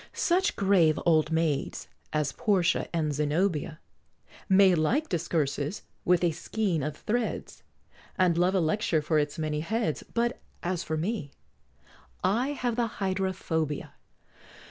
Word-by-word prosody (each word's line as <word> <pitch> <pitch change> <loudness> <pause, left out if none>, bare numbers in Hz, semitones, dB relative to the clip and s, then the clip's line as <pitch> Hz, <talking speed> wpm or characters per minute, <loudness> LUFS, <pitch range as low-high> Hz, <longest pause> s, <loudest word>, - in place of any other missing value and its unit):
Such 375 +4 +1
grave 180 -6 +3
old 155 -2 +3
maids 160 -4 -1 0.2
as 150 -2 0
Portia 190 - +1
and 155 -3 0
Zenobia 155 +2 0 0.7
May 190 -1 +6
like 230 - +1
discourses 155 -1 -1 0.2
with 180 0 +3
a 170 - +3
skein 180 0 -1
of 150 +1 -3
threads, 235 +1 -3 0.6
And 180 -3 +3
love 180 +3 +2
a - - +4
lecture 160 -1 +1
for 155 0 +2
its 145 0 -2
many 155 -1 -1
heads, 170 -1 -1
But 240 +2 0 0.2
as 175 -1 -1
for 155 - -2
me, 175 -2 -2 0.9
I 220 +8 +2
have 245 -4 -2
the 240 -1 +2
Hydra 190 -1 0
phobia. 160 -5 -3
170 Hz, 135 wpm, -28 LUFS, 155-200 Hz, 0.9 s, May